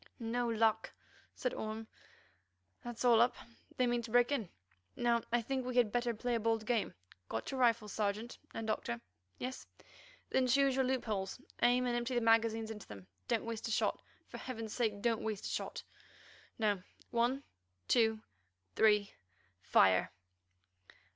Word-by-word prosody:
"No 240 +1 -1
luck!" 220 -1 +2 0.4
said 250 - -2
Orme; 220 +1 -4 1.0
"that's 240 0 -4
all 235 -2 +7
up, 245 +1 +4 0.4
they 255 - +3
mean 240 0 +1
to 230 - -8
break 245 +3 +4
in. 230 -11 -1 0.5
Now 235 -1 +2
I 240 0 +2
think 265 +2 -1
we 250 0 -4
had 235 -4 +4
better 240 +1 +1
play 245 +3 -2
a 230 - +2
bold 225 0 0
game. 230 -2 0 0.3
Got 110 0 -3
your 265 - -3
rifles, 230 -4 +2
Sergeant 215 +3 -2
and 225 - -5
Doctor? 120 - -2 0.4
Yes? 255 +1 -5 0.6
Then 260 -1 +3
choose 275 +2 +4
your 265 -1 +2
loopholes, 220 -6 -2 0.2
aim, 250 +1 +4
and 245 -1 0
empty 240 +1 -1
the 240 - +2
magazines 225 -1 +3
into 210 -2 -8
them. 100 -3 -10 0.2
Don't - - 0
waste 230 0 -4
a - - -3
shot. - - +1 0.3
For - - -8
heaven's 225 -4 -5
sake 215 -4 -1
don't 230 -2 +2
waste 215 -3 -3
a - - -2
shot. - - -4 0.7
Now—one—two—three, 205 - 0 0.5
fire!" 95 0 +4
230 Hz, 150 wpm, -35 LUFS, 215-245 Hz, 1.0 s, all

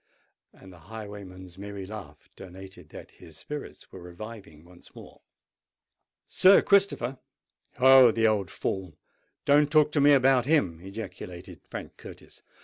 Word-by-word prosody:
"—and 95 -1 -16
the 90 - -16
highwayman's 100 -4 -10
merry 100 -1 -8
laugh 95 -8 -11
denoted 95 -3 -13
that - - -12
his 80 -2 -15
spirits 150 -1 -9
were 95 - -11
reviving 90 -3 -11
once 90 0 -19
more. - - -14 1.1
"Sir 190 +1 +5
Christopher! 190 - +1 0.6
Oh! 130 -1 +7
the 115 0 0
old 105 -4 +1
fool—don't 120 - -2
talk 150 -1 +4
to 150 - +1
me 145 +1 +6
about 130 -2 +3
him!" 95 - +1
ejaculated 95 -2 -9
Frank - - -9
Curtis. - - -14
100 Hz, 130 wpm, -26 LUFS, 90-130 Hz, 1.1 s, Oh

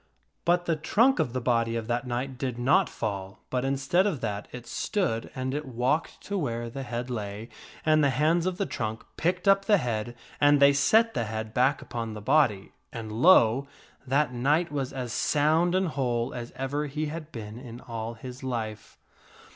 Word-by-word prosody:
But 175 +1 +3
the 165 - +1
trunk 225 - +3
of 125 - +1
the 130 - -2
body 115 -2 +1
of 115 -1 -2
that 120 +2 -2
knight 125 +1 -3
did 130 -3 -2
not 160 +10 +3
fall, 100 -2 -5
but 125 -1 0
instead 135 +8 +2
of 165 -9 -1
that 105 -2 -3
it 125 -1 -8
stood, 150 - -1
and 130 0 -2
it 150 +1 -2
walked 130 +6 -1
to 200 -1 -3
where 120 -6 -3
the 135 - -5
head 120 0 -4
lay, 105 0 -5 0.4
and 155 -1 +4
the 140 - +4
hands 155 +6 +2
of 185 -1 -2
the 200 - 0
trunk 110 -6 -4
picked 180 +3 -1
up 195 0 +5
the 210 -2 +5
head 120 - -3 0.2
and 145 0 +5
they 140 0 +7
set 220 +11 +4
the 115 - -1
head 110 0 -5
back 130 +4 +2
upon 115 -2 -5
the - - -6
body, 110 -4 +2 0.2
and, 115 -2 -6
lo! 125 0 +5 0.4
that 140 0 +2
knight 150 +8 +1
was 140 -3 -2
as 125 -3 -4
sound 160 +4 +2
and 185 -2 +2
whole 120 -5 -1
as 120 -1 -6
ever 140 +3 -2
he 150 +2 -3
had 155 +1 -6
been 110 0 -7
in 120 -2 -9
all 115 -1 -5
his 125 +2 -9
life. 110 -5 -5
130 Hz, 195 wpm, -27 LUFS, 115-155 Hz, 0.4 s, they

